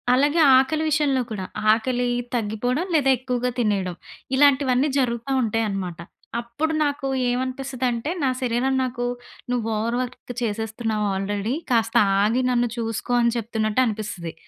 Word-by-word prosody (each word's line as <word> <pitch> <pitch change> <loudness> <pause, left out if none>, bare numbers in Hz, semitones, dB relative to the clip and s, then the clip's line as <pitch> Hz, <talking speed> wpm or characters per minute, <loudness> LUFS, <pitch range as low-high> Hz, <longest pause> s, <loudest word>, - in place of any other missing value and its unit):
అలాగే 290 +5 +2 0.2
ఆకలి 305 +4 +2
విషయంలో 285 -3 +2
కూడా 195 -3 -4 0.3
ఆకలి 245 +2 0 0.3
తగ్గిపోవడం, 245 - -1
లేదా 270 -2 +3
ఎక్కువగా 250 -1 -1
తినేయడం. 195 -6 0 0.4
ఇలాంటివన్నీ 275 -1 +4
జరుగుతా 235 0 -1
ఉంటాయన్నమాట. 200 -6 -2 0.4
అప్పుడు 240 +7 -2
నాకు 285 -1 -2 0.2
ఏమనిపిస్తదంటే 255 0 -2
నా 270 - +2
శరీరం 250 +1 0
నాకు 245 -1 -3 0.5
నువ్వు 240 -3 -1
ఓవర్ 230 +3 -1
వర్క్ 255 0 -5
చేసేస్తున్నావు 220 -1 -2
ఆల్రెడీ. 200 +4 -2 0.2
కాస్త 225 -1 +1 0.3
ఆగి 225 +5 +2
నన్ను 245 -1 +1
చూసుకో 225 +1 -3
అని 235 -1 +2
చెప్తున్నట్టు 220 0 0
అనిపిస్తది. 210 -7 -4
240 Hz, 125 wpm, -23 LUFS, 220-260 Hz, 0.5 s, ఇలాంటివన్నీ